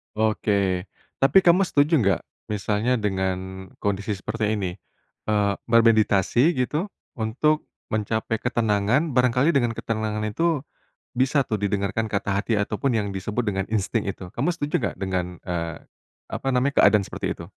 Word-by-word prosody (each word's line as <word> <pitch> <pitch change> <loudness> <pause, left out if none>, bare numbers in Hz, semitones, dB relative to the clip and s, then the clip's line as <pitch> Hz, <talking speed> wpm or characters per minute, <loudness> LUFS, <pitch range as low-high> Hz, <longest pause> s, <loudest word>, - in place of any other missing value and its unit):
Oke, 100 -4 +1 0.3
tapi 140 +8 +5
kamu 180 +2 +5
setuju 150 +1 +3
nggak 100 -5 +2 0.3
misalnya 105 +4 0
dengan 95 -2 -2 0.2
kondisi 100 +1 -1
seperti 110 +2 -2
ini, 95 -4 -2 0.6
eee, 105 -2 +2
bermeditasi 115 - +4
gitu 150 +9 -1 0.3
untuk 145 +8 +1 0.2
mencapai 110 +1 -1
ketenangan? 120 +5 +1
Barangkali 125 +4 +3
dengan 120 -6 +1
ketenangan 110 -1 -2
itu, 150 +7 0 0.5
bisa 130 +2 +2
tuh 105 -2 -2
didengarkan 100 +2 -1
kata 100 0 0
hati 110 -2 0
ataupun 105 +6 -1
yang 100 -2 -3
disebut 105 +5 -2
dengan 95 0 -2
insting 110 +1 0
itu. 95 - -8
Kamu 140 +8 +1
setuju 150 -4 -1
gak - - -13
dengan, 90 -2 -3
eee, 85 -2 -4 0.4
apa - - -6
namanya, 130 +2 +2
keadaan 105 -3 +5
seperti - - -4
itu? - - -8
110 Hz, 140 wpm, -24 LUFS, 100-125 Hz, 0.6 s, tapi